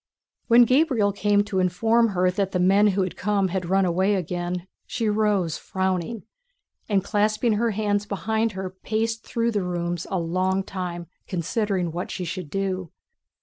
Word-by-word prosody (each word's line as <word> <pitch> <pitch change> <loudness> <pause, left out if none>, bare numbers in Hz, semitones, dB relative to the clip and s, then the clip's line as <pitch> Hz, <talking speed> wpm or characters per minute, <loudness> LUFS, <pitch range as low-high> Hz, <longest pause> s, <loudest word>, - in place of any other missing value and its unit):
When 235 +1 +7
Gabriel 255 -5 +3
came 205 0 +2
to 200 -2 -2
inform 225 +6 +3
her 180 0 +3
that 195 0 -2
the 180 - +1
men 195 +3 +5
who 195 -1 +2
had 185 - -4
come 200 -1 0
had 180 -1 -3
run 195 0 +3
away 190 +4 +2
again, 175 0 -3 0.2
she 225 - -2
rose 210 -6 +1
frowning, 190 +3 -2 0.7
and 195 -3 +2
clasping 215 +3 +1
her 230 +3 +1
hands 205 -1 -1
behind 220 +3 -1
her 190 -1 -5
paced 220 +4 -2
through 235 0 -1
the 205 -2 0
rooms 175 -1 -3
a 190 - -1
long 185 +3 0
time 180 -3 -5 0.2
considering 185 0 -1
what 175 +2 -4
she 180 - -4
should 175 -2 -5
do. 190 -2 -2
195 Hz, 165 wpm, -24 LUFS, 180-210 Hz, 0.7 s, When